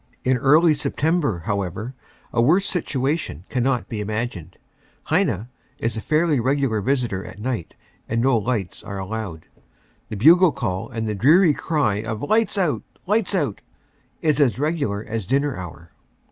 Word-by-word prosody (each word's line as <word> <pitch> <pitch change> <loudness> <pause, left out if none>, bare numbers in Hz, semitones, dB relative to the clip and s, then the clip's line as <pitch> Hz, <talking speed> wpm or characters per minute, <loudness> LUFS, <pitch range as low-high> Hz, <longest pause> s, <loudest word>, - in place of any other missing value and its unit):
In 130 0 +2
early 155 +6 +5
September, 145 - 0
however, 100 +3 -3 0.4
a 115 - +3
worse 175 +11 +4
situation 140 - -2
cannot 125 0 0
be 110 -2 -4
imagined. 105 -5 -4 0.5
"Heine" 110 +7 0 0.3
is 115 0 -2
a 110 - -4
fairly 155 0 +2
regular 130 -3 +1
visitor 120 -5 -1
at - - -10
night 115 -4 -4 0.3
and 115 - 0
no 130 +1 +3
lights 110 -4 -2
are 100 -2 -6
allowed. 95 -4 -5 0.6
The 105 - -5
bugle 165 - +6
call 100 -8 -3
and 115 -3 -3
the 105 - -1
dreary 155 - +5
cry 140 -10 0
of 110 +1 -5
"lights 215 +5 +1
out 180 -6 +1 0.2
lights 210 0 +1
out," 145 - -1 0.6
is 155 -2 +2
as 120 -7 +3
regular 140 -9 -1
as 110 -4 -4
dinner 140 +2 +1
hour. 85 -2 -9
125 Hz, 150 wpm, -22 LUFS, 105-150 Hz, 0.6 s, bugle